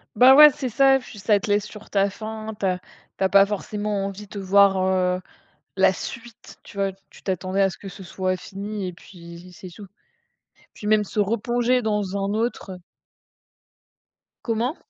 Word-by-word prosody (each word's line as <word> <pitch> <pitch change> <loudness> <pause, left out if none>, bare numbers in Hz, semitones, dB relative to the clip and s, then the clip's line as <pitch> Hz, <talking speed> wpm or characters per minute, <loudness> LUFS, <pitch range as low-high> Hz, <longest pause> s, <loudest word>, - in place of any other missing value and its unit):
Bah 255 +4 +8
ouais, 300 0 +10
c'est 260 -1 -4
ça, 270 +3 +4
puis 250 -4 -13
ça 205 0 +2
te 215 - -6
laisse 205 0 +1
sur 210 0 -12
ta 200 -1 +2
faim, 220 +1 -7
tu 195 - 0
as 180 - 0 0.4
tu - - -2
as 190 - +2
pas 200 0 +6
forcément 205 0 -3
envie 200 +1 -7
de 200 +1 -8
voir, 195 0 +4
heu, 185 -1 +1 0.6
la 190 0 +4
suite, 235 +3 -9
tu - - -15
vois, 195 -1 0 0.2
tu - - -18
t'attendais 185 +1 -1
à 195 - +4
ce - - -10
que 200 - -10
ce 190 0 -10
soit 185 +1 -2
fini 200 +2 -6
et 180 - -4
puis 170 0 -13
c'est 185 +1 -11
tout. 200 +3 -12 0.9
Puis 210 - -9
même 210 0 +3
se 210 - -3
replonger 235 +4 +1
dans 210 -3 -1
un 195 +1 -2
autre, 225 -2 -2
heu - - -8 1.7
Comment? 235 +6 -1
200 Hz, 185 wpm, -23 LUFS, 190-220 Hz, 1.7 s, ouais